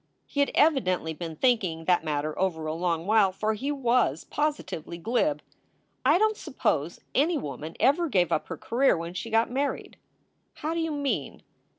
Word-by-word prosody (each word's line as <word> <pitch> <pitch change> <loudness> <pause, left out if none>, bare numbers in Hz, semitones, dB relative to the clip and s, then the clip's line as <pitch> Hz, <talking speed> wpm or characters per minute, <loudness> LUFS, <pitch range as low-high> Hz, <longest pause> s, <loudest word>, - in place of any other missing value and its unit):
He 285 - -5
had 280 - +3
evidently 185 - +2
been 165 0 -6
thinking 185 -9 +1
that 175 -2 +3
matter 150 -1 -2
over 170 -4 0
a 155 - -2
long 170 0 -1
while, 210 -2 +4
for 215 +3 -1
he 270 +7 -3
was 245 - +1
positively 295 - -3
glib: 245 - 0 0.6
"I 295 +6 +5
don 435 +2 +3
t - - -17
suppose 165 - -1
any 315 +4 +2
woman 150 - -6
ever 315 +5 +3
gave 180 - +2
up 155 - 0
her - - -5
career 255 -3 +2
when 170 +1 -5
she 230 - -5
got 225 +1 +2
married." 275 +2 -2 0.6
"How 315 +2 -3
do 335 - -1
you 325 -1 -1
mean?" 285 -2 -2
220 Hz, 180 wpm, -27 LUFS, -, 0.6 s, I